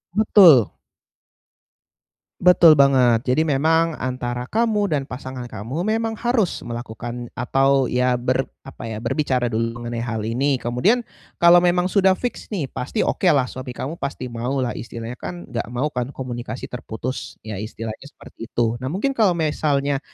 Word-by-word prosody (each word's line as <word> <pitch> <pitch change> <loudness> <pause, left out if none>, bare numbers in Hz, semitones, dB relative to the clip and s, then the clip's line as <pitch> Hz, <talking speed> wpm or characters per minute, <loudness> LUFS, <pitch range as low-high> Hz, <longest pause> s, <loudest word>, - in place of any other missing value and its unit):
Betul. 185 - +6 1.7
Betul 175 -2 +7
banget. 130 -3 +4
Jadi 130 +5 +3
memang 160 +2 +1
antara 125 -1 -3
kamu 215 - +1
dan 140 - -1
pasangan 130 -1 -7
kamu 120 - -5
memang 225 +2 -1
harus 235 -4 0
melakukan 120 0 -6
atau 135 +2 +2
ya 125 0 +2
ber 130 +2 0 0.2
apa 135 -3 -9
ya, 110 - -5
berbicara 130 -2 0
dulu 115 +1 -1
mengenai 120 0 -5
hal 115 -2 -3
ini. 130 +6 +1
Kemudian 130 - +1 0.3
kalau 170 +1 +7
memang 180 +1 +1
sudah 190 -2 +4
fiks 245 +5 -5
nih, 170 - -4
pasti 210 - -2
oke 190 - 0
lah, 145 -6 +4
suami 125 0 -7
kamu 150 +8 -5
pasti 130 -3 -5
mau 120 +3 -3
lah, 120 - -1
istilahnya 115 +1 -7
kan 175 -5 -8
enggak 120 -1 -3
mau 125 +5 -2
kan 125 +2 -4
komunikasi 120 -2 -6
terputus, 125 +1 -6
ya 110 -3 -6
istilahnya 110 +3 -7
seperti 115 -4 -12
itu. 115 0 -1
Nah, 130 - -4
mungkin 195 - -1
kalau 215 -9 +2
misalnya 145 -3 0
130 Hz, 155 wpm, -22 LUFS, 120-165 Hz, 1.7 s, Betul